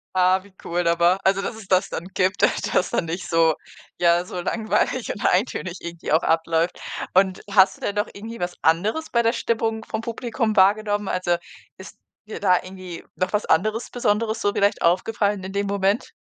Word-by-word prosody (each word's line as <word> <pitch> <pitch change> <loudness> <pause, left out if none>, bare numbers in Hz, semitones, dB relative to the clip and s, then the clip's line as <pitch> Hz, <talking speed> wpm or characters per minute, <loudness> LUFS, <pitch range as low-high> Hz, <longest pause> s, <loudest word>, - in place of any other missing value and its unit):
Ah, 185 +1 +3
wie 200 0 -19
cool 175 0 0
aber 170 +2 +3
also, 195 0 +2
dass 200 - -4
es 220 -3 -12
das 190 +1 +3
dann 170 - -5
gibt, 190 +1 +1 0.3
dass 180 - +2
da - - +1
nicht 170 +2 -5
so, 165 -1 +3 0.4
ja, 170 0 +3
so 180 0 -6
langweilig 225 +5 -1
und - - -8
eintönig 185 -2 0
irgendwie 170 0 -6
auch 160 +3 +3
abläuft. 165 +1 +1 0.3
Und 190 0 +3
hast 195 -1 +5
du - - -22
denn 200 - -2
noch 205 0 -1
irgendwie 225 +3 -9
was 175 0 -3
anderes 210 - +1
bei 235 - +2
der 230 0 +2
Stimmung 225 -2 -1
vom 220 - -4
Publikum 230 -1 -2
wahrgenommen? 205 +1 +3
Also, 180 -2 0 0.4
ist 190 - -12 0.3
dir 215 - -7
da 185 -3 +4
irgendwie 185 -2 -9
noch 185 - -2
was 210 0 0
anderes 215 +7 +1
Besonderes 225 -1 0
so 205 - +1
vielleicht 200 0 +1
aufgefallen 200 +2 +1
in 190 - -6
dem 200 +1 -1
Moment? 200 +2 0
195 Hz, 190 wpm, -23 LUFS, 180-215 Hz, 0.4 s, hast